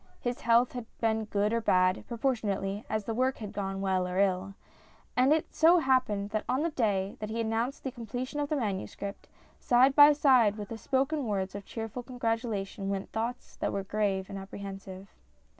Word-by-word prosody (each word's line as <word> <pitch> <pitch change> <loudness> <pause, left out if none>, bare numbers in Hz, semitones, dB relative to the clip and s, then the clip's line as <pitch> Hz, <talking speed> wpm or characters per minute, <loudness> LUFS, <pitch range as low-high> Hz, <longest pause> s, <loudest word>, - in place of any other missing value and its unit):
His 245 0 -3
health 235 +1 +4
had 245 -3 -6
been 220 -1 +1
good 210 +1 0
or 230 - +1
bad, 185 -3 +2
proportionately 215 -5 -1
as 215 -1 -1
the 225 - -3
work 255 +3 +1
had 210 -3 -7
gone 195 -1 -3
well 190 -2 +1
or 180 0 -3
ill. 195 0 +1 0.6
And 280 +5 +4
so 335 +2 +5
it - - +2
happened 235 -7 +1
that 215 0 -1
on 260 +4 +1
the 335 - 0
day 200 -7 0
that 215 - -5
he 225 +1 -3
announced 230 +4 -1
the 265 - -3
completion 245 +5 -5
of 290 -1 -1
the 305 - +1
manuscript, 200 -4 -4 0.3
side 255 +2 +4
by 290 0 +9
side 255 -8 +4
with 205 -2 -6
the 230 - -5
spoken 275 +3 0
words 195 -2 -2
of 200 0 -7
cheerful 225 +1 -5
congratulation 225 -5 -3
went 195 -1 -3
thoughts 230 +3 -4
that - - -1
were 195 - -2
grave 195 -1 -1
and 195 - -6
apprehensive. 195 0 -8
220 Hz, 190 wpm, -29 LUFS, 195-250 Hz, 0.6 s, by